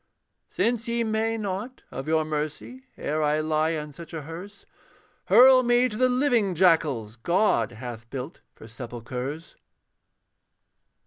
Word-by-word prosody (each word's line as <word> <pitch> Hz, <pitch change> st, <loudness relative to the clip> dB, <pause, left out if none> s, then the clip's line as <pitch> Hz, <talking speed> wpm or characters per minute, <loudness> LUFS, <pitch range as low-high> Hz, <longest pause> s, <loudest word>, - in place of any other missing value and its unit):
Since 235 Hz, 0 st, 0 dB
ye 235 Hz, 0 st, 0 dB
may 225 Hz, +1 st, 0 dB
not, 210 Hz, +4 st, -5 dB
of 135 Hz, +3 st, -6 dB
your 160 Hz, 0 st, +2 dB
mercy, 155 Hz, -, -5 dB
Ere 155 Hz, +2 st, -2 dB
I 150 Hz, 0 st, +2 dB
lie 155 Hz, +1 st, +1 dB
on 150 Hz, 0 st, -6 dB
such 170 Hz, +2 st, -10 dB
a 155 Hz, -, -5 dB
hearse, 180 Hz, +6 st, -10 dB, 0.6 s
Hurl 255 Hz, +6 st, +7 dB
me 245 Hz, 0 st, +3 dB
to 210 Hz, -, -7 dB
the 255 Hz, +3 st, +3 dB
living 245 Hz, -7 st, +2 dB
jackals 150 Hz, -, +2 dB
God 150 Hz, -, +1 dB
hath 120 Hz, -1 st, -8 dB
built 135 Hz, +5 st, -7 dB
for -, -, -13 dB
sepulchres. 125 Hz, +6 st, -7 dB
165 Hz, 135 wpm, -26 LUFS, 140-225 Hz, 0.6 s, Hurl